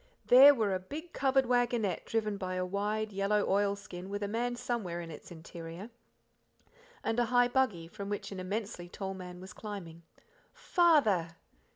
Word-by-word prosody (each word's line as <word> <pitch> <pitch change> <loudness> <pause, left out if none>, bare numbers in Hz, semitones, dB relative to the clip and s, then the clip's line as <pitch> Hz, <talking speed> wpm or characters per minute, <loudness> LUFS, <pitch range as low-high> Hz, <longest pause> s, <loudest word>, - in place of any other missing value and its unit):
There 275 +3 +9
were 215 -5 +1
a 185 - 0
big, 305 - -8
covered 270 -1 +2
waggonette 240 -5 +1
driven 215 -2 0
by 185 -1 -4
a 185 0 -1
wide 210 +3 -2
yellow 200 +1 +1
oil 200 +1 +2
skin 190 -2 -9
with 205 +1 -3
a - - -1
man 240 +3 -1
somewhere 215 -8 -3
in 165 -1 -7
its 150 - -11
interior, 170 +4 -9 1.1
and 225 +1 0
a 240 - +3
high 245 +1 +4
buggy, 220 -11 0
from 200 +2 -7
which 205 0 -4
an 195 - -6
immensely 195 -1 -4
tall 195 +1 -5
man 180 -1 -9
was 185 +2 -10
climbing. 185 -6 -8 0.5
"Father!" 300 - +3
205 Hz, 170 wpm, -31 LUFS, 185-240 Hz, 1.1 s, There